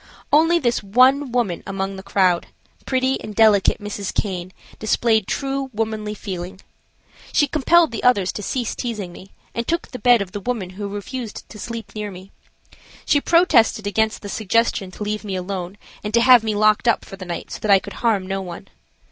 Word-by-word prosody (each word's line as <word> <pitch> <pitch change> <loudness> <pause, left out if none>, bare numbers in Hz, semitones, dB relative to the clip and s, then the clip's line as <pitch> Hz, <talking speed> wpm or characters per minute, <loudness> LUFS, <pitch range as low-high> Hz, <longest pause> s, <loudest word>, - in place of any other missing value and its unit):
Only 325 +3 +5
this 240 -7 0
one 255 +6 +3
woman 235 -8 0
among 195 0 -3
the 190 - -8
crowd, 190 -3 +1 0.4
pretty 260 0 +1
and 215 - -8
delicate 215 -3 +4
Mrs. 205 -2 -5
Caine, 185 -3 -3 0.3
displayed 220 -1 +1
true 275 -1 -2
womanly 215 -1 -2
feeling. 185 -2 -6 0.7
She 290 - +4
compelled 315 +4 +3
the 225 - -4
others 205 -7 +3
to - - -6
cease 240 +3 -2
teasing 215 -7 -4
me 190 +2 -12 0.2
and 235 0 -3
took 335 +1 -1
the 250 - -8
bed 245 -4 +5
of 185 - -13
the 205 - -5
woman 205 -4 -3
who 200 +2 -5
refused 210 +3 -6
to 210 - -11
sleep 225 -2 -7
near 210 -1 -4
me. 190 0 -12 0.7
She 290 - +3
protested 260 - +3
against 215 +2 0
the 205 - -6
suggestion 220 -1 0
to 185 - -7
leave 210 +1 -3
me 200 -3 -4
alone 185 0 -5 0.3
and 210 - -3
to 235 - +5
have 250 -2 +7
me 215 -1 -1
locked 215 +3 +3
up 235 - +2
for - - -9
the 190 - -9
night 175 -1 -6
so - - -6
that 215 - -4
I 200 - +8
could - - -7
harm 215 -5 +2
no 195 +1 -3
one. 175 -2 -9
215 Hz, 195 wpm, -21 LUFS, 195-240 Hz, 0.7 s, I